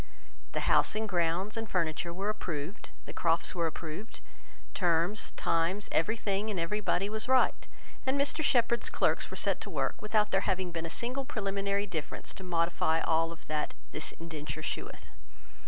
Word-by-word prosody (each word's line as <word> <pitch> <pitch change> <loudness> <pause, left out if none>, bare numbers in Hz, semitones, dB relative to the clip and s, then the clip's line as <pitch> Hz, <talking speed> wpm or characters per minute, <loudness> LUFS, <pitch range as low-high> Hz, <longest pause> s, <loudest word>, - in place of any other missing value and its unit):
The - - 0
house - - +4
and 220 0 0
grounds, 180 +2 +1
and 225 -2 -3
furniture, 170 -1 0
were 195 +4 -2
approved, 170 -3 -4 0.2
the - - -8
Crofts 165 0 +2
were 170 -2 +1
approved, 160 +7 -6 0.5
terms, 175 +3 +1
time, 165 +4 +1
every 220 +8 +2
thing, 205 0 0
and 200 -4 -1
every 170 +6 0
body, 195 -1 +1
was 220 +2 -2
right; 260 0 +3 0.4
and 265 +1 +1
Mr 285 +3 +2
Shepherd's 235 -3 +3
clerks - - +1
were - - -6
set - - +2
to - - -5
work, - - -1
without 210 0 +2
there 195 - +3
having 185 -1 0
been 165 0 -3
a - - -6
single 250 +8 -1
preliminary 200 -3 -1
difference 160 -6 -5
to 190 - -9
modify 170 -2 +2
of - - -1
all 165 +1 +2
that 150 0 -2 0.2
"This 155 - -2
indenture 155 -1 -6
sheweth." - - -4
185 Hz, 170 wpm, -31 LUFS, 165-215 Hz, 0.5 s, house